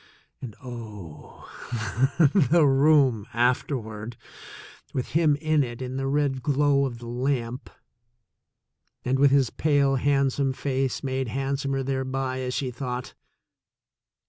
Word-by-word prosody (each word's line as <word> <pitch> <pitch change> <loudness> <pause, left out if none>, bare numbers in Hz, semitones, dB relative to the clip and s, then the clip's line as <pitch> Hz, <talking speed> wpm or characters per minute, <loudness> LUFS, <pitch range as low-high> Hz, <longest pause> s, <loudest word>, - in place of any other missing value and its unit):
And, 120 -5 -7
oh, 105 - -10 1.0
the 165 -1 +5
room 135 -5 +4
afterward, 115 -2 -1 0.8
with 130 - -2
him 155 -2 +3
in 155 0 +1
it 120 -2 -6
in 130 0 -5
the 135 0 -2
red 140 -2 0
glow 140 0 +2
of 120 -3 -7
the 120 - -11
lamp, 125 +1 -2 1.4
and 130 +2 +1
with 140 0 +6
his 135 -3 +3
pale 140 -3 +2
handsome 135 0 +1
face 135 -1 -2
made 130 -1 -2
handsomer 135 +2 -2
thereby, 130 0 -2
as 125 -1 -3
she 130 -3 -2
thought! 125 0 -5
135 Hz, 120 wpm, -25 LUFS, 125-140 Hz, 1.4 s, with